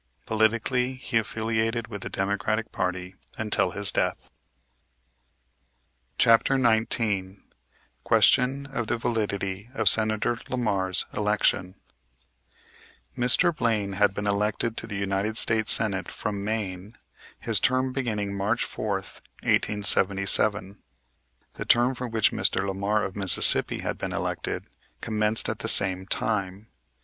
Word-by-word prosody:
Politically 115 Hz, +4 st, 0 dB
he 120 Hz, -3 st, -1 dB
affiliated 110 Hz, +1 st, -2 dB
with 105 Hz, -3 st, -8 dB
the -, -, -5 dB
Democratic 105 Hz, +3 st, -2 dB
party 90 Hz, 0 st, -3 dB, 0.2 s
until 105 Hz, -3 st, 0 dB
his 100 Hz, +2 st, +1 dB
death. -, -, -2 dB, 1.9 s
CHAPTER 115 Hz, +3 st, +4 dB
XIX 110 Hz, -5 st, +1 dB, 0.6 s
QUESTION 135 Hz, +3 st, +3 dB
OF 120 Hz, -4 st, -2 dB
THE 120 Hz, -, -1 dB
VALIDITY 105 Hz, -3 st, -3 dB
OF -, -, 0 dB
SENATOR 110 Hz, +1 st, +3 dB
LAMAR'S 100 Hz, -7 st, -1 dB
ELECTION 105 Hz, -3 st, 0 dB, 1.4 s
Mr. 130 Hz, +7 st, +3 dB
Blaine 110 Hz, -6 st, -1 dB
had 100 Hz, 0 st, +2 dB
been 105 Hz, -, -4 dB
elected 105 Hz, +3 st, 0 dB
to -, -, -2 dB
the 105 Hz, -3 st, -5 dB
United 100 Hz, +2 st, -2 dB
States 110 Hz, -2 st, +3 dB
Senate 100 Hz, -4 st, 0 dB
from 100 Hz, -1 st, -5 dB
Maine, 105 Hz, -1 st, -4 dB, 0.4 s
his 115 Hz, -3 st, +1 dB
term 130 Hz, 0 st, +1 dB
beginning 105 Hz, -6 st, -2 dB
March 105 Hz, +4 st, -1 dB
4th, 100 Hz, -3 st, -5 dB, 0.2 s
1877. 100 Hz, 0 st, +1 dB, 0.7 s
The -, -, -6 dB
term 120 Hz, +2 st, +3 dB
for 125 Hz, 0 st, -5 dB
which 110 Hz, -2 st, +2 dB
Mr. -, -, +1 dB
Lamar, 100 Hz, +2 st, -1 dB
of 95 Hz, -, -5 dB
Mississippi, 95 Hz, -5 st, +2 dB
had -, -, -4 dB
been -, -, -4 dB
elected, -, -, -3 dB, 0.3 s
commenced 105 Hz, 0 st, +1 dB
at -, -, -3 dB
the -, -, -1 dB
same 95 Hz, 0 st, +3 dB
time. 100 Hz, -1 st, -3 dB
105 Hz, 120 wpm, -25 LUFS, 100-115 Hz, 1.9 s, CHAPTER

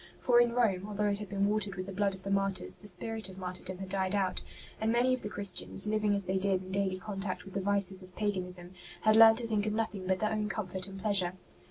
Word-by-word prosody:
For 240 Hz, -1 st, +3 dB
in 240 Hz, -1 st, +1 dB
Rome, 205 Hz, -6 st, +1 dB
although 210 Hz, 0 st, -2 dB
it 200 Hz, 0 st, -1 dB
had 210 Hz, -2 st, -7 dB
been 200 Hz, 0 st, 0 dB
watered 205 Hz, -2 st, 0 dB
with 185 Hz, 0 st, -5 dB
the 195 Hz, -, -7 dB
blood 200 Hz, 0 st, 0 dB
of 190 Hz, -, -12 dB
the 195 Hz, -, -4 dB
martyrs, 195 Hz, -2 st, +1 dB
the 205 Hz, -, -12 dB
spirit 220 Hz, +3 st, -1 dB
of 190 Hz, -, -11 dB
martyrdom 185 Hz, 0 st, -6 dB
had 190 Hz, 0 st, -7 dB
died 190 Hz, 0 st, -1 dB
out; 190 Hz, -2 st, 0 dB, 0.4 s
and 220 Hz, +1 st, +1 dB
many 245 Hz, +2 st, +3 dB
of 255 Hz, -, -1 dB
the 210 Hz, -, -4 dB
Christians, 200 Hz, -1 st, 0 dB
living 210 Hz, -1 st, +1 dB
as 200 Hz, -1 st, 0 dB
they 190 Hz, +1 st, 0 dB
did 190 Hz, -1 st, 0 dB
in 185 Hz, -, -10 dB
daily 190 Hz, -1 st, 0 dB
con 195 Hz, +1 st, -7 dB
tact 185 Hz, -2 st, -3 dB
with 195 Hz, -, -11 dB
the 195 Hz, -, -2 dB
vices 195 Hz, -1 st, +4 dB
of 185 Hz, -1 st, -13 dB
paganism, 180 Hz, -4 st, -1 dB, 0.3 s
had 215 Hz, 0 st, +4 dB
learnt 225 Hz, 0 st, +8 dB
to 240 Hz, -, -2 dB
think 215 Hz, -2 st, 0 dB
of 210 Hz, -, -1 dB
nothing 215 Hz, -4 st, -3 dB
but 190 Hz, 0 st, +2 dB
their 215 Hz, +2 st, -1 dB
own 215 Hz, -1 st, -1 dB
comfort 190 Hz, -3 st, -3 dB
and 195 Hz, 0 st, -9 dB
pleasure. 195 Hz, -3 st, +2 dB
200 Hz, 260 wpm, -31 LUFS, 185-215 Hz, 0.4 s, learnt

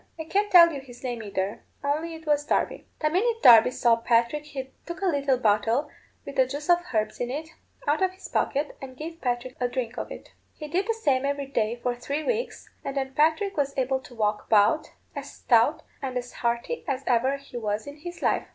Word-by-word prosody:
I -, -, -2 dB
can't 400 Hz, +6 st, 0 dB
tell 340 Hz, -2 st, +8 dB
you 275 Hz, -, -5 dB
his 245 Hz, -2 st, -14 dB
name 240 Hz, -3 st, -3 dB
either, 200 Hz, -1 st, -3 dB, 0.2 s
only 310 Hz, +4 st, -1 dB
it 320 Hz, 0 st, -12 dB
was 295 Hz, -1 st, +2 dB
Darby. -, -, -1 dB
The 305 Hz, 0 st, +2 dB
minute 455 Hz, +6 st, +1 dB
Darby 230 Hz, -1 st, +9 dB
saw 235 Hz, -2 st, +3 dB
Patrick 235 Hz, +5 st, +1 dB
he 265 Hz, -3 st, -7 dB, 0.2 s
took 345 Hz, -, -5 dB
a -, -, +2 dB
little 280 Hz, -6 st, +2 dB
bottle, 230 Hz, +5 st, +1 dB, 0.3 s
with 280 Hz, -, -8 dB
the 260 Hz, -1 st, +5 dB
juice 290 Hz, +5 st, -1 dB
of 350 Hz, -, +6 dB
herbs 215 Hz, -2 st, -1 dB
in 245 Hz, -, -2 dB
it, 305 Hz, +5 st, -4 dB, 0.4 s
out 295 Hz, +4 st, +2 dB
of 375 Hz, -, +4 dB
his 375 Hz, -, -10 dB
pocket, 285 Hz, +2 st, -1 dB
and 260 Hz, -1 st, -9 dB
gave 330 Hz, +3 st, -7 dB
Patrick 245 Hz, 0 st, -2 dB
a 245 Hz, -, +3 dB
drink 245 Hz, -1 st, -4 dB
of -, -, -5 dB
it. -, -, -9 dB, 0.3 s
He 305 Hz, -, -7 dB
did 365 Hz, +7 st, 0 dB
the 455 Hz, -, +1 dB
same 275 Hz, -12 st, +1 dB
every 280 Hz, 0 st, -1 dB
day 230 Hz, -4 st, 0 dB
for 245 Hz, -, +1 dB
three 280 Hz, +5 st, -3 dB
weeks, 480 Hz, +3 st, -2 dB, 0.2 s
and 275 Hz, 0 st, -4 dB
then 265 Hz, -1 st, -2 dB
Patrick 320 Hz, +8 st, +2 dB
was 280 Hz, -2 st, -1 dB
able 265 Hz, 0 st, +1 dB
to 260 Hz, -2 st, -14 dB
walk 210 Hz, -1 st, -1 dB
about, 215 Hz, +7 st, +4 dB, 0.3 s
as -, -, -6 dB
stout -, -, +3 dB, 0.2 s
and 260 Hz, -2 st, -3 dB
as 245 Hz, 0 st, -5 dB
hearty 235 Hz, -, -2 dB
as 270 Hz, -2 st, -2 dB
ever 255 Hz, +3 st, +2 dB
he 275 Hz, -3 st, -10 dB
was 215 Hz, -2 st, -2 dB
in 285 Hz, +1 st, -9 dB
his 350 Hz, +3 st, -8 dB
life. -, -, +1 dB
275 Hz, 220 wpm, -26 LUFS, 245-310 Hz, 0.4 s, Darby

